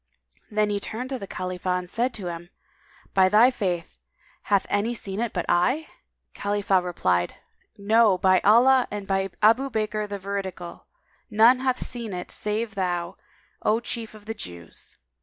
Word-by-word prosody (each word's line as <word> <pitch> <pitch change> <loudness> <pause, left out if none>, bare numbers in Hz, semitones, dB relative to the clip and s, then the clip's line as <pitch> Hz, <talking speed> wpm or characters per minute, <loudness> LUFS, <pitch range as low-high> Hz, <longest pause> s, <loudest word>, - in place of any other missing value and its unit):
Then 210 -1 +1
he 205 - 0
turned 245 +6 -6
to 260 - -2
Khalifah 185 0 -2
and 180 0 -5
said 240 +7 0
to 200 - -7
him, 175 0 -6 0.6
"By 190 -1 +5
thy 225 +6 +6
faith, 180 -8 -3 0.5
hath 200 -2 +3
any 215 +4 0
seen 195 -2 -5
it 235 -2 -1
but 175 -3 -2
I?" 255 - +1 0.4
Khalifah 200 -2 +1
replied, 90 - 0 0.4
"No, 215 -1 +4
by 185 0 +4
Allah, 250 +6 +5
and 205 -1 -5
by 195 0 0
Abu 240 +6 +5
Bakr 215 -2 -2
the 200 - -3
Veridical, 190 -3 -6
[FN#204] 215 - -17
none 240 +4 +7
hath 260 -1 0
seen 235 -5 -3
it 180 0 -6
save 215 +1 -2
thou, 180 -2 -2 0.5
O 215 +2 +2
chief 230 -2 -5
of 210 -1 -14
the 225 - -4
Jews!" 85 - -8
205 Hz, 160 wpm, -25 LUFS, 185-225 Hz, 0.6 s, none